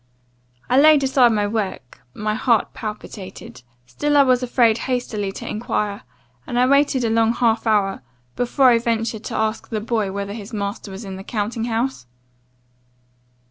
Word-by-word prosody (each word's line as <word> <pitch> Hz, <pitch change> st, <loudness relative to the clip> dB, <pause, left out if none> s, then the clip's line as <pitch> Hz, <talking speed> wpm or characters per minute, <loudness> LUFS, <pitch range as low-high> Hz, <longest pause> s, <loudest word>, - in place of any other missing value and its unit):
I 255 Hz, +2 st, +4 dB
laid 300 Hz, -1 st, +6 dB
aside 260 Hz, -3 st, +4 dB
my 210 Hz, -2 st, +1 dB
work; 205 Hz, -, -4 dB
my 215 Hz, 0 st, -2 dB
heart 230 Hz, 0 st, +1 dB
palpitated; 210 Hz, -, -8 dB, 0.2 s
still 290 Hz, -, 0 dB
I 280 Hz, -, +7 dB
was 255 Hz, -2 st, +3 dB
afraid 235 Hz, -2 st, +2 dB
hastily 220 Hz, -6 st, -2 dB
to -, -, -8 dB
enquire; 210 Hz, -2 st, -2 dB, 0.5 s
and 240 Hz, -, -3 dB
I 250 Hz, -, +4 dB
waited 280 Hz, -1 st, +3 dB
a 230 Hz, -, +1 dB
long 225 Hz, 0 st, +3 dB
half 230 Hz, -2 st, +1 dB
hour, 200 Hz, -3 st, +1 dB, 0.3 s
before 255 Hz, +1 st, +3 dB
I 235 Hz, -, +4 dB
ventured 230 Hz, -1 st, -2 dB
to -, -, -4 dB
ask 220 Hz, 0 st, -2 dB
the 220 Hz, -, -2 dB
boy 215 Hz, -3 st, -1 dB
whether 200 Hz, +1 st, -4 dB
his 215 Hz, +1 st, -9 dB
master 200 Hz, 0 st, -4 dB
was 195 Hz, +3 st, -8 dB
in 190 Hz, -1 st, -7 dB
the 190 Hz, -, -8 dB
counting 225 Hz, +2 st, -3 dB
house? 230 Hz, -, -2 dB
225 Hz, 165 wpm, -21 LUFS, 205-245 Hz, 0.5 s, I